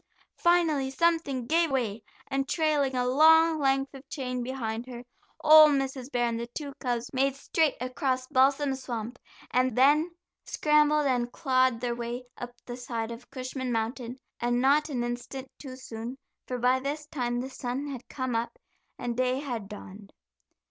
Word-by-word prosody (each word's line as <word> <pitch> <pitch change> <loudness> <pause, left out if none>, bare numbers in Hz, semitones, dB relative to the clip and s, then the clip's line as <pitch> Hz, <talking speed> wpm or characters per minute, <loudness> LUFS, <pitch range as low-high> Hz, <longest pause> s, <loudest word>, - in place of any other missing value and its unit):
Finally 330 -6 +3
something 285 -4 +1
gave 330 +5 +2
way, 230 -6 -1 0.3
and 270 0 -2
trailing 295 -5 +1
a 250 0 +1
long 320 +4 +6
length 270 -1 +1
of 270 +1 -13
chain 255 -4 -3
behind 240 -2 -4
her, 245 -1 -8 0.4
old 310 -1 +8
Mrs. 270 -1 -2
Bear 240 -1 +1
and 230 -1 -1
the 235 - -4
two 280 +3 -6
cubs 245 -1 -2
made 270 +1 +1
straight 300 +1 +1
across 255 0 -1
Balsam 270 +2 +3
Swamp, 245 -2 -5 0.3
and 255 -1 +1
then 295 +6 +5 0.3
scrambled 300 0 +3
and 245 -3 0
clawed 255 -4 +2
their 245 -1 -1
way 240 +1 -5
up 245 0 -8
the 245 0 -6
side 235 -2 -4
of 235 +1 -10
Cushman 260 -1 -4
Mountain, 235 +2 -3 0.2
and 240 0 +1
not 285 +4 +3
an 250 -4 -2
instant 245 +2 -5
too 265 -3 -8
soon, 240 0 -7 0.3
for 250 - -3
by 250 +2 +3
this 290 +3 -4
time 245 -5 -2
the 260 +2 -4
sun 255 +2 -4
had 270 -4 -7
come 260 -3 -3
up, 230 +1 -2 0.4
and 240 -1 -3
day 255 +1 +1
had 240 -8 -5
dawned. 200 -1 -11
260 Hz, 165 wpm, -28 LUFS, 240-280 Hz, 0.4 s, old